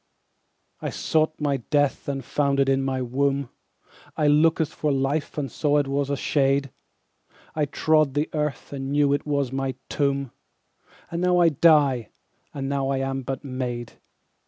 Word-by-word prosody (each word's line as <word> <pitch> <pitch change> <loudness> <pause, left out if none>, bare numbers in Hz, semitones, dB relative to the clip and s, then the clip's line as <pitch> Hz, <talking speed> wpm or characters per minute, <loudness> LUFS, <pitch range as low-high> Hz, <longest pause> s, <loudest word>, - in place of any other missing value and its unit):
13I - - -4
sought 155 0 0
my 145 -2 0
death 145 +3 0
and 135 -2 -3
found 140 -1 0
it 135 - +3
in 135 0 +2
my 130 -1 -1
womb,14I 140 +3 -1
lookt 165 -1 +3
for 150 -2 -1
life 140 +3 -1
and 140 -3 -3
saw 150 -1 +1
it 145 -2 +1
was 140 0 -1
a 140 - -1
shade,15I 140 +2 -3
trode 155 -3 +2
the 150 +1 +1
earth 150 -3 -3
and 135 0 -4
knew 145 -1 +3
it 145 - -2
was 140 -3 0
my 135 -1 -2
tomb,16And 140 +4 -5
now 180 0 +3
I 175 -1 +5
die, 145 -6 +3 0.4
and 135 -1 -4
now 135 -1 -1
I 135 - 0
am 135 0 -2
but 135 +2 -5
made. 125 -3 -4
140 Hz, 155 wpm, -24 LUFS, 135-150 Hz, 0.4 s, I